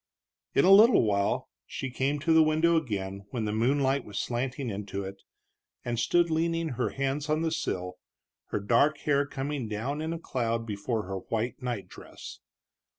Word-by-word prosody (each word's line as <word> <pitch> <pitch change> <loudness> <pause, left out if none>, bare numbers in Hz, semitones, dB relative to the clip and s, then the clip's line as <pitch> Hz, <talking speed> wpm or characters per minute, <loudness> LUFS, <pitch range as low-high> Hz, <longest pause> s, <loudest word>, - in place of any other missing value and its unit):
In - - +5
a 190 - +6
little 215 - +8
while 100 -2 0 0.2
she 135 - -5
came 135 +3 0
to 165 +2 +3
the 160 - +7
window 160 +2 +3
again, 100 -9 -3
when 115 -2 -3
the 105 - -1
moonlight 135 +4 +2
was 100 -1 -8
slanting 125 +1 -2
into 100 0 -4
it, 95 0 -8 0.6
and 120 -1 -1
stood 170 +5 +2
leaning 165 0 0
her 125 - -1
hands 140 +2 -2
on 155 +1 +1
the 165 - 0
sill, 90 - -3 0.5
her - - -2
dark 120 +9 +3
hair 140 -1 +2
coming 140 -3 -3
down 125 +8 -3
in 160 +1 -2
a 165 - -2
cloud 115 -7 -2 0.2
over 115 -3 0
her 95 0 -4
white 115 +6 -3
night 120 -7 -3
dress. - - -11
130 Hz, 175 wpm, -28 LUFS, 110-155 Hz, 0.6 s, little